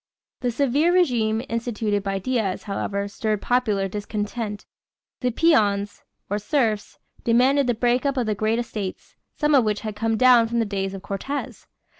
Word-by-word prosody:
The 250 - -1
severe 280 +7 +2
régime 240 -10 +2
instituted 225 -3 -1
by 195 0 -2
Diaz, 205 -2 -1
however, 200 0 -3
stirred 215 +1 -2
popular 215 -6 +1
discontent. 210 +1 -4 0.5
The 250 - 0
peons, 205 -8 +2 0.3
or 205 +1 -1
serfs, 215 -2 -1 0.3
demanded 255 +4 +3
the 245 - +1
break 245 +2 +1
up 275 -1 0
of 250 - +1
the 215 - 0
great 215 +2 0
estates, 215 -5 -5 0.2
some 295 -1 +1
of 270 -4 +6
which 210 -1 -1
had 215 -1 -5
come 225 +1 0
down 245 -1 +6
from 235 +1 -2
the 230 - +2
days 195 -1 -3
of 195 - -9
Cortez. 270 +9 -5
225 Hz, 165 wpm, -23 LUFS, 205-250 Hz, 0.5 s, of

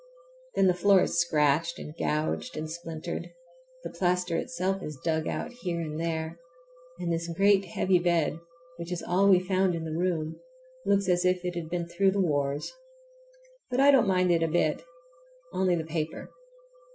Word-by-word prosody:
Then 195 - +4
the 185 - +5
floor 190 +1 +4
is - - 0
scratched 160 0 +2
and 150 - -8
gouged 155 0 -2
and 155 +1 -3
splintered, 165 -1 -6 0.5
the - - -6
plaster 180 -1 0
itself 195 -2 -2
is 150 -4 -6
dug 160 -1 0
out 245 - -3
here 170 -2 -2
and 155 -1 -4
there, 165 0 -3 0.6
and 175 -1 -2
this 165 0 -2
great 195 +3 +3
heavy 185 +1 +1
bed, 170 -2 +1 0.4
which 170 +1 -7
is 180 - -3
all 195 +3 +3
we 185 -2 +7
found 185 -1 +1
in 165 - -4
the 160 - -4
room, 165 -3 -1 0.5
looks 200 -1 +2
as 180 -1 +2
if 180 0 +1
it 180 - -2
had 170 -2 -5
been 175 0 -2
through 190 +3 +2
the 200 +1 0
wars. 145 - 0 1.0
But 250 +1 -1
I 280 +1 +7
don't 265 -7 +4
mind 185 -1 +3
it 170 -1 +3
a 165 - +2
bit—only 170 +2 -2
the 165 - -2
paper. 160 0 -4
170 Hz, 175 wpm, -28 LUFS, 160-185 Hz, 1.0 s, we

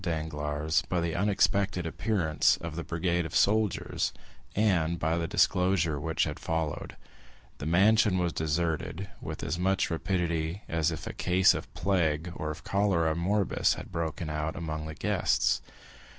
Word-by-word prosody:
Danglars 75 -2 -1
by 90 - +1
the 85 -1 -1
unexpected 100 -1 +1
appearance 85 -3 +1
of 80 -2 -6
the 85 - -4
brigade 85 +1 0
of 80 - -6
soldiers, 105 -1 +1 0.4
and 85 -6 +2
by 80 0 0
the 85 -1 -1
disclosure 90 -4 +2
which 80 +2 0
had - - -3
followed, 80 -3 -3 0.6
the 70 - -4
mansion 100 +3 +4
was 90 -2 0
deserted 80 +4 -2
with - - -6
as 85 - -2
much 95 -1 +1
rapidity 85 0 -1
as 80 -1 +1
if 80 - -5
a - - -5
case 90 +1 +4
of - - -6
plague 85 -3 0
or 75 - -4
of 75 - -6
cholera 90 -6 +1
morbus 95 +4 +1
had - - -9
broken 80 -1 -3
out 75 +2 -2
among 80 -3 -4
the 80 - -7
guests. - - +1
85 Hz, 150 wpm, -29 LUFS, 80-95 Hz, 0.6 s, mansion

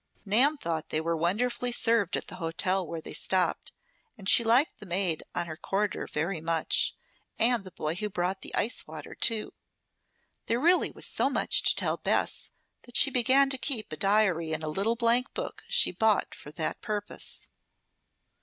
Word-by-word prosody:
Nan 255 +10 +4
thought 165 - -4
they 155 - 0
were 165 +1 -1
wonderfully 235 +9 -1
served 230 -6 +1
at - - -5
the 185 - -10
hotel 185 +2 -1
where 165 -1 -6
they - - -9
stopped, 185 -1 0 0.5
and 195 -3 -9
she 235 - +7
liked 240 +7 +2
the 210 - -11
maid 180 -2 0
on 175 - -1
her 160 -2 -7
corridor 195 +4 -3
very 160 +2 -2
much, 165 -1 +1 0.4
and 235 -2 +3
the 190 - -10
boy 155 -2 -3
who 210 +4 -3
brought 185 0 -2
the - - -6
icewater, 230 - -3
too. 225 -2 +1 0.9
There 230 +1 0
really 350 +6 +3
was - - -5
so - - 0
much - - +2
to - - +5
tell - - 0
Bess - - -1 0.3
that 245 - 0
she 280 - +6
began 265 +2 +3
to 265 - 0
keep 240 - -2
a - - -4
diary 185 -3 +1
in 155 0 -3
a 155 - -3
little 200 +8 0
blank 240 +2 +1
book - - -6
she 485 0 +4
bought 215 +3 +1
for - - -11
that 155 +1 -3
purpose. 210 -1 -5
200 Hz, 180 wpm, -28 LUFS, 170-235 Hz, 0.9 s, she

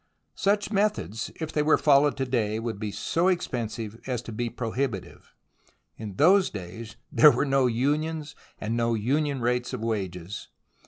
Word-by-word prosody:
Such 205 +1 0
methods, 200 - 0
if 160 -1 -4
they 150 - +2
were 155 +1 +4
followed 145 -1 +4
to 135 - 0
day, 110 -4 0
would 115 -2 -4
be 105 -1 -3
so 170 - 0
expensive 115 - -2
as 125 -3 -2
to 120 - -8
be 120 +2 -2
prohibitive. 115 -3 -4 0.6
In 105 -3 -7
those 190 - +5
days 105 +3 -8 0.2
there 150 - +8
were 145 - +1
no 135 -2 +3
unions, 150 +5 -1 0.3
and 110 +2 -2
no 115 0 +1
union 140 +5 0
rates 125 +1 0
of 125 - -4
wages. 100 -4 -4
125 Hz, 160 wpm, -26 LUFS, 110-150 Hz, 0.6 s, there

